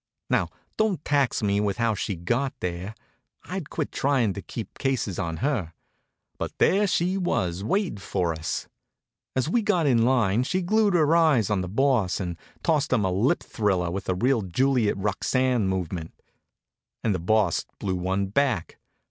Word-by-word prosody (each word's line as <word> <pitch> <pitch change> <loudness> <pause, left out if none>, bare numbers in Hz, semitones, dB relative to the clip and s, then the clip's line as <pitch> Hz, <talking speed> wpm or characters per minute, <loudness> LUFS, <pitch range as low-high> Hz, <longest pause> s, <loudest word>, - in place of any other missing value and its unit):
Now - - +2 0.3
don't 210 -8 0
tax 140 -6 +1
me 100 0 +2
with 105 -1 0
how 115 -2 +2
she 100 0 -3
got 120 +11 -1
there. 90 +4 -4 0.5
I'd 180 -4 -5
quit - - -3
trying 130 -7 +1
to 100 - -6
keep 110 -1 -8
cases 130 -9 -1
on 85 -3 -2
her. 110 - -1 0.7
But - - -4
there 205 +2 +3
she 180 +1 +1
was 95 - -1
waiting 175 - 0
for 90 -3 -1
us. 80 0 -4 0.7
As 130 +1 +1
we 230 +8 +2
got 190 -6 +1
in 125 -5 +4
line 120 -4 +3
she 185 +8 -1
glued 210 +1 +3
her 160 -1 +4
eyes 145 - +4
on 100 -2 +1
the 90 - -4
Boss 115 -4 +2
and 90 -3 -3 0.3
tossed 155 -3 +1
him 115 -6 +2
a 95 - +1
lip 120 - +1
thriller 95 -5 0
with 95 +2 -4
a 95 - +2
real 120 +5 +2
Juliet 115 +4 +1
Roxane 115 +3 +1
movement. 90 -3 -3 0.8
And 110 - +2
the 90 - -2
Boss 100 0 +1
blew 95 -2 -2
one 95 +2 0
back. 110 - 0
110 Hz, 170 wpm, -25 LUFS, 95-140 Hz, 0.8 s, in